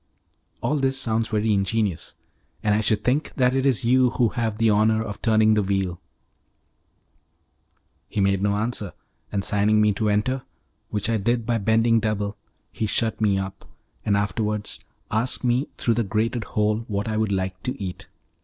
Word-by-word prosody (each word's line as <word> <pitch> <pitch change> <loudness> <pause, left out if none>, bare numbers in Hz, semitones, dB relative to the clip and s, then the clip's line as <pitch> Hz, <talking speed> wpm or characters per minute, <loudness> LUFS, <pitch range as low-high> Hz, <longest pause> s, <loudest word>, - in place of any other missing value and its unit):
"All 140 +6 0
this 135 -1 +1
sounds 115 -2 0
very 110 0 +1
ingenious, 100 -2 -1 0.5
and 105 - +3
I 105 - +2
should 105 0 +1
think 135 +6 0
that 125 -1 +3
it 135 +1 +2
is 125 -4 +1
you 125 +1 +4
who 120 -2 +1
have 110 -2 -2
the 115 -1 +3
honour 110 +1 +3
of 105 -2 -7
turning 110 -1 +4
the 105 - +3
wheel." 95 -2 -1 2.1
He - - -3
made 100 -1 +2
no 100 0 +1
answer, 105 -2 -2 0.4
and 100 -2 -1
signing 105 +1 +3
to - - +4
me 105 -1 +4
to 105 +2 0
enter, 120 +6 0 0.5
which 105 -1 -1
I 115 -1 +1
did 115 +3 0
by 115 0 +1
bending 115 +2 +3
double, 105 -1 -2 0.4
he 110 - -2
shut 110 +1 -1
me 100 -3 +3
up, 95 0 -5 0.4
and 100 -1 +2
afterwards 105 +1 -2 0.3
asked 115 +5 0
me 125 +3 +1
through 115 - +1
the 115 +1 +1
grated 110 +3 -1
hole 105 0 +1
what 100 0 -2
I 110 - -1
would 110 -1 0
like 95 -1 -2
to 125 +2 -4
eat. 95 -3 -6
110 Hz, 180 wpm, -24 LUFS, 100-115 Hz, 2.1 s, you